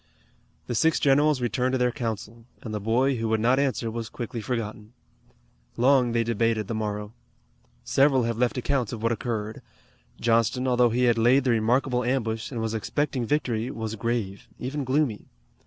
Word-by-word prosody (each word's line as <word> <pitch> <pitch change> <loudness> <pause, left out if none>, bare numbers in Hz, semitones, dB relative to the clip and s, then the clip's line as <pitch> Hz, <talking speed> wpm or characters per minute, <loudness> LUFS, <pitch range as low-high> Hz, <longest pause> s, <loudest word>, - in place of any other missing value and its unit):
The - - -4
six 160 +7 +2
generals 145 0 +3
returned 125 +1 0
to - - +2
their 125 -1 +2
council, 115 -1 -5 0.2
and 110 - -6
the 105 - -2
boy 125 +6 +1
who 115 0 -2
would 110 0 +1
not 125 +4 +3
answer 130 -4 0
was 115 0 -5
quickly 120 -1 -5
forgotten. 110 -2 -4 0.8
Long 125 0 +4
they 115 0 +1
debated 115 -1 0
the - - -3
morrow. 105 -1 -3 0.7
Several 135 - +3
have 115 0 -1
left 125 +1 +1
accounts 125 -2 0
of 115 -2 -6
what 115 - +2
occurred. 110 -2 -3 0.6
Johnston, 115 +3 +1
although 125 -1 +4
he 120 +2 0
had 120 -2 +3
laid 125 +4 +4
the 130 - +2
remarkable 125 +3 +1
ambush, 115 -3 -1
and 120 - -5
was 110 0 -2
expecting 125 +2 -2
victory, 125 -5 0
was 110 -1 -4
grave, 110 -4 -3
even 140 +3 -4
gloomy. 130 -4 0
120 Hz, 170 wpm, -26 LUFS, 110-130 Hz, 0.8 s, Long